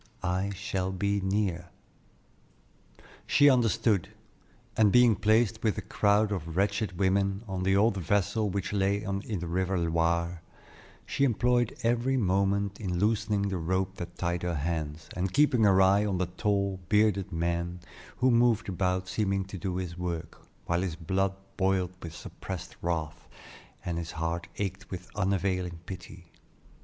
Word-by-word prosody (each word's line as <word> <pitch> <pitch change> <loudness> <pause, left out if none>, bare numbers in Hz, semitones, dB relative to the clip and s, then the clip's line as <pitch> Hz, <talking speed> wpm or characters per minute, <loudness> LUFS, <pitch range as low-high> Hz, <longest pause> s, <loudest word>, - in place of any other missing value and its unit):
I 90 +2 0
shall 95 -1 -2
be 100 +2 0
near." 95 -3 -1 1.6
She 145 -1 +6
understood, 115 -5 +2 0.7
and 105 -2 +4
being 120 -1 +6
placed 110 +2 +2
with 110 -2 +1
a - - -4
crowd 105 +1 +2
of 85 -4 -4
wretched 100 -1 0
women 100 +2 +1
on 95 -1 -3
the 95 +1 +2
old 100 +1 +3
vessel 100 +4 +1
which 100 +1 -3
lay 100 +1 +1
in 100 -1 -2
the 100 -4 -4
river 95 +2 0
Loire, 85 0 0 0.6
she - - -1
employed 120 -2 +2
every 120 +3 +2
moment 100 -1 +1
in 90 -5 -2
loosening 105 0 +1
the 95 -2 -2
rope 95 +3 -1
that 85 0 -7
tied 85 0 -1
her 90 -1 -1
hands, 80 0 -3
and 90 +1 -2
keeping 140 -6 +4
her 95 -2 +5
eye 100 +2 +4
on 100 -3 0
the 90 - +1
tall, 100 +1 -1
bearded 105 -3 +2
man 85 +1 -2 0.4
who 130 0 +3
moved 115 -2 +3
about 95 0 0
seeming 95 0 0
to 95 0 -8
do 90 +1 -3
his 90 -1 -4
work, 85 -3 -5 0.2
while 85 +1 0
his 90 -4 -2
blood 95 +4 -1 0.2
boiled 95 -2 +1
with 85 -1 -7
suppressed 90 -1 -7
wrath, 80 -2 -3 0.6
and 85 -1 -2
his 85 -1 -6
heart 85 +1 -3
ached 100 0 -4
with 90 -1 -7
unavailing 95 -3 0
pity. 90 -1 -9
95 Hz, 150 wpm, -29 LUFS, 90-105 Hz, 1.6 s, She